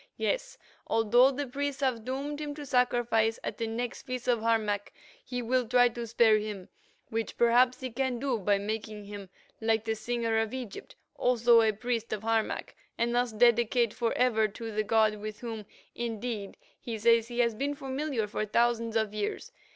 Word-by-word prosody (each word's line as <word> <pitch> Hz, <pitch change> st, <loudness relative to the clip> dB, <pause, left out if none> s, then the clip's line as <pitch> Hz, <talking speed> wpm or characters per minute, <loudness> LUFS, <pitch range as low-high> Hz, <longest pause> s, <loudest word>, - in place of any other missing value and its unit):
Yes, -, -, -2 dB, 0.3 s
although 235 Hz, +4 st, +5 dB
the 280 Hz, +1 st, -3 dB
priests 280 Hz, +1 st, -3 dB
have 255 Hz, -5 st, 0 dB
doomed 280 Hz, +4 st, -4 dB
him 295 Hz, -1 st, -4 dB
to 295 Hz, -1 st, -7 dB
sacrifice 240 Hz, -3 st, +2 dB
at -, -, -5 dB
the 230 Hz, -, -1 dB
next 235 Hz, +2 st, -4 dB
feast 255 Hz, -1 st, -5 dB
of 240 Hz, -2 st, +3 dB
Harmac, 215 Hz, -3 st, 0 dB, 0.3 s
he 245 Hz, -1 st, -4 dB
will 250 Hz, +1 st, +1 dB
try 245 Hz, +1 st, +5 dB
to 235 Hz, 0 st, -6 dB
spare 225 Hz, -1 st, +4 dB
him, 210 Hz, -3 st, -6 dB, 0.4 s
which, 225 Hz, 0 st, -3 dB
perhaps, 245 Hz, +2 st, +4 dB
he 255 Hz, -1 st, -4 dB
can 255 Hz, +1 st, -1 dB
do 250 Hz, -2 st, -1 dB
by 200 Hz, +1 st, +2 dB
making 210 Hz, 0 st, -5 dB
him, 200 Hz, -2 st, -8 dB, 0.3 s
like 225 Hz, 0 st, +1 dB
the 225 Hz, -, 0 dB
Singer 230 Hz, 0 st, -1 dB
of 225 Hz, +2 st, -2 dB
Egypt, 245 Hz, -6 st, -8 dB, 0.2 s
also 235 Hz, -1 st, +5 dB
a 220 Hz, -1 st, +3 dB
priest 230 Hz, +1 st, -3 dB
of 215 Hz, 0 st, -4 dB
Harmac, 225 Hz, -1 st, -1 dB, 0.2 s
and 235 Hz, +1 st, 0 dB
thus 245 Hz, 0 st, +1 dB
dedicate 235 Hz, 0 st, +3 dB
forever 230 Hz, -2 st, +2 dB
to 225 Hz, +2 st, -7 dB
the 215 Hz, 0 st, 0 dB
god 215 Hz, 0 st, +2 dB
with 215 Hz, 0 st, -7 dB
whom, 225 Hz, -4 st, -6 dB, 0.3 s
indeed, 230 Hz, -3 st, -4 dB, 0.2 s
he 230 Hz, -2 st, -5 dB
says 230 Hz, +1 st, +4 dB
he 240 Hz, 0 st, -7 dB
had 235 Hz, -3 st, +1 dB
been 285 Hz, +1 st, -1 dB
familiar 270 Hz, -3 st, -2 dB
for 210 Hz, +1 st, -3 dB
thousands 230 Hz, +1 st, +1 dB
of 220 Hz, -2 st, +1 dB
years. 210 Hz, -1 st, -3 dB
230 Hz, 180 wpm, -29 LUFS, 220-250 Hz, 0.4 s, although